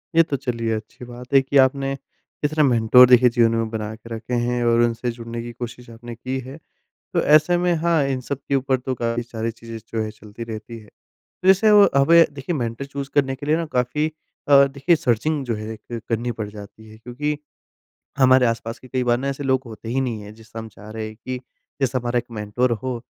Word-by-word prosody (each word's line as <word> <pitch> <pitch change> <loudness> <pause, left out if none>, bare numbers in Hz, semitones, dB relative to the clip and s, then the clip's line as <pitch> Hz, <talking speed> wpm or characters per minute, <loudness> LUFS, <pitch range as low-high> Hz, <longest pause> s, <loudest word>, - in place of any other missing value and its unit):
ये 165 - +7
तो 140 - 0
चलिए 115 -4 -2
अच्छी 110 +3 -9
बात 125 +2 -11
है 135 - +7
कि 135 +1 0
आपने 135 +1 +3 0.5
इतने 155 +1 +2
मेंटर 125 -1 +6
देखिए 125 0 +7
जीवन 115 -1 +3
में 115 -1 -1
बना 110 -1 -4
के 115 +1 -15
रखे 115 +2 -7
हैं 120 0 0
और 120 0 +4
उनसे 120 +1 0
जुड़ने 115 0 -7
की 120 0 -7
कोशिश 120 0 -8
आपने 115 +1 -9
की 130 +3 -4
है। 135 +3 -9 0.6
तो - - +2
ऐसे 155 +4 +4
में 175 0 +2
हाँ 170 -4 +3
इन 130 -2 -2
सब 135 +2 -4
के 140 - +2
ऊपर 130 0 +1
तो 130 +1 -4
काफ़ी 115 0 -2
सारी 115 -1 -4
चीज़ें 115 0 -9
जो 110 -1 -1
है 110 - -5
चलती 105 +2 -10
रहती 115 +1 -7
है। 110 - -16 0.4
तो 185 - -5
जैसे 195 +3 +6
वो 205 -1 +7
हमें 165 +5 +6
देखिए 140 +5 -4
मेंटर 115 +1 -3
चूज़ 140 0 -6
करने 135 -2 +2
के 145 - -8
लिए 155 +2 +3
ना 165 - -2
काफ़ी 125 +5 +1 0.4
अ, 140 -1 +8
देखिए 140 +5 +1
सर्चिंग 140 +4 0
जो 115 - -1
है 110 - -6
ए - - -4
एक 115 +2 -8
करनी 120 +1 -1
पड़ 105 - -3
जाती 105 +1 -12
है 110 0 -14
क्योंकि 145 +6 -3 0.8
हमारे 130 -1 +5
आस-पास 115 0 -3
के 130 - -15
कई 130 0 -1
बार 120 0 +2
ना 140 - -3
ऐसे 140 +1 -4
लोग 130 -1 +1
होते 110 0 -9
ही 130 +3 0
नहीं 120 -5 -2
हैं 105 +1 -11
जिससे 110 0 -12
हम 110 0 -6
चाह 105 +1 -13
रहे 110 0 -5
हैं 110 - -10
कि 130 +2 -5 0.4
जैसे 130 -1 +1
हमारा 120 0 -1
1 120 - -3
मेंटर 105 +5 0
हो। 120 +2 -2
125 Hz, 230 wpm, -22 LUFS, 115-135 Hz, 0.8 s, अ